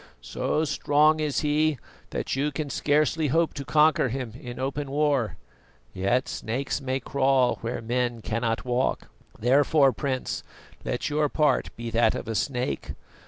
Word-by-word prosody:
So 65 - -1
strong 150 0 +3
is 150 -2 0
he 150 0 +2 0.3
that - - -3
you 145 +2 0
can 145 -1 -4
scarcely 150 +1 +1
hope 165 +4 +2
to 140 - -5
conquer 150 -1 +3
him 125 -2 -4
in 125 0 -8
open 135 +2 -3
war 140 - +1 0.6
yet 100 +8 +1
snakes 130 +5 -3
may 130 0 -1
crawl 135 -1 +2
where 115 +1 -4
men 120 -1 -1
cannot 115 +1 -1
walk. 125 +1 -1 0.3
Therefore, 135 +3 +4
Prince, 130 -3 -2 0.4
let 125 - -2
your 150 0 +1
part 150 +1 +2
be 115 0 -6
that 115 0 +3
of - - -5
a 115 - -2
snake. 125 +5 -2
135 Hz, 150 wpm, -26 LUFS, 120-150 Hz, 0.6 s, Therefore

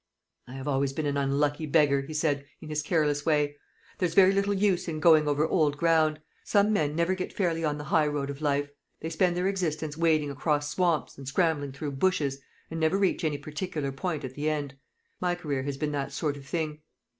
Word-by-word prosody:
"I 125 - -10
have 135 +1 -6
always 135 -1 +1
been 155 +2 -2
an 145 -1 0
unlucky 145 +2 0
beggar," 145 -2 +3
he 145 +3 -8
said, 150 -2 +1 0.2
in 155 - -10
his 150 0 -1
careless 150 -2 +1
way. 145 -2 +1 0.4
"There's 170 -3 0
very 190 -1 +7
little 200 +1 +1
use 190 -2 +1
in 155 -2 -3
going 155 -2 +5
over 145 +1 +2
old 150 -4 +2
ground. 160 -2 +3 0.2
Some 210 +1 +3
men 150 -6 +1
never 170 +3 +2
get 185 -1 -4
fairly 165 -4 -1
on 150 -1 0
the 150 - -6
high 155 0 +2
road 145 -1 -2
of 140 +1 -9
life. 145 -1 0 0.3
They 160 - -5
spend 175 +1 +1
their 180 +1 +1
existence 160 -6 -2
wading 155 -3 +2
across 145 +1 -1
swamps, 170 -8 0
and 135 - -9
scrambling 150 -2 +1
through 140 +2 -5
bushes, 140 -2 0 0.3
and 165 - -3
never 160 +4 +2
reach 195 -3 +1
any 155 -2 0
particular 150 0 -4
point 155 +2 -3
at 130 - -7
the 145 +3 -1
end. 145 -3 -3 0.4
My 180 -1 0
career 145 -6 -3
has 140 0 -4
been 150 +1 -2
that 140 -1 -3
sort 145 0 -2
of 140 -1 -12
thing." 155 -1 -2
150 Hz, 215 wpm, -28 LUFS, 145-170 Hz, 0.4 s, very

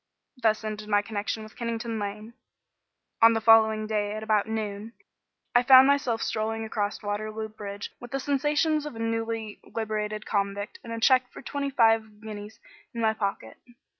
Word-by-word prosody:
Thus 220 -1 +2
ended 215 0 -5
my 205 -1 +3
connection 215 +1 -3
with 215 - -13
Kennington 230 -1 -3
Lane. 210 +3 -5 0.9
On 230 0 +8
the 225 - +1
following 220 -1 +5
day 210 -1 -1
at 215 0 -5
about 215 -1 +2
noon, 215 0 -4 0.6
I 245 - +6
found 260 +1 +8
myself 265 -5 +1
strolling 220 +1 -2
across 210 -1 -3
Waterloo 215 +1 -3
Bridge 205 -1 -7
with 245 - -10
the 275 - -2
sensations 295 +2 +1
of 295 - -8
a - - -8
newly 225 -1 -3
liberated 215 -1 -3
convict 200 0 -2
and 230 - -8
a 230 - -3
cheque 255 +1 +4
for - - -11
twenty 280 -1 -3
five 225 -4 +2
guineas 215 0 -9 0.4
in 230 - -2
my 220 -1 +3
pocket. 195 - -4
220 Hz, 165 wpm, -27 LUFS, 210-230 Hz, 0.9 s, On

